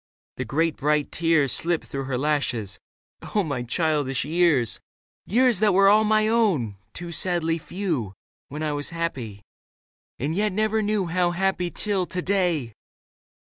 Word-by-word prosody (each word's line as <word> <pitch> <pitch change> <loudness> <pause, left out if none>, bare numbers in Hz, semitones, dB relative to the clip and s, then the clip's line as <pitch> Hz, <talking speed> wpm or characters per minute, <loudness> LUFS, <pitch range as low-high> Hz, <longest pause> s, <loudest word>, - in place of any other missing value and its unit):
The - - -3
great 160 +2 0
bright 150 0 +1
tears 165 -5 +2
Slipped 170 -1 0
through 135 -1 -5
her 130 -1 -2
lashes, 125 -9 -1 0.2
" - - -15
Oh, 205 - +3
my 145 -7 -3
childish 140 0 0
years! 155 -7 +2 0.5
Years 245 0 +3
that 210 -3 +3
were 195 +1 +6
all 215 +2 +5
my 215 0 +3
own, 185 - +1
too 175 -1 -6
sadly 170 -2 0
few. 160 - -3 0.3
When 150 +3 -5
I 155 - 0
was 145 0 -2
happy 130 -12 -4 0.4
— - - -90
and 145 +5 -2
yet 210 0 0
never 215 +2 +1
knew 210 -2 0
How 175 +1 +1
happy 180 0 0
till 195 -1 -2
to 185 - -4
day 175 - 0
165 Hz, 160 wpm, -24 LUFS, 140-195 Hz, 0.5 s, were